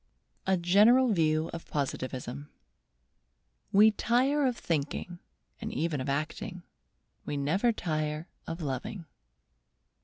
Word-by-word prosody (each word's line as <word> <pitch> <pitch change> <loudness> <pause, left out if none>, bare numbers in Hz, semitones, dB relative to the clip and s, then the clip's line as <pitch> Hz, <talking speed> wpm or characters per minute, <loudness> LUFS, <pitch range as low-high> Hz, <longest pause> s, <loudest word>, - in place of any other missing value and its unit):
A 190 -1 +3
GENERAL 210 +9 +5
VIEW 155 -2 +2
OF 165 - -7
POSITIVISM 130 -1 -4 1.2
'We 210 +2 +7
tire 265 +6 +2
of 245 -2 -1
thinking 165 +3 -3 0.4
and - - -5
even 160 -4 -1
of 135 - -3
acting; 155 +6 -3 0.6
we 145 - -3
never 175 - +2
tire 155 -4 -2 0.2
of 165 +1 -5
loving. 150 - -4
165 Hz, 110 wpm, -30 LUFS, 150-205 Hz, 1.2 s, We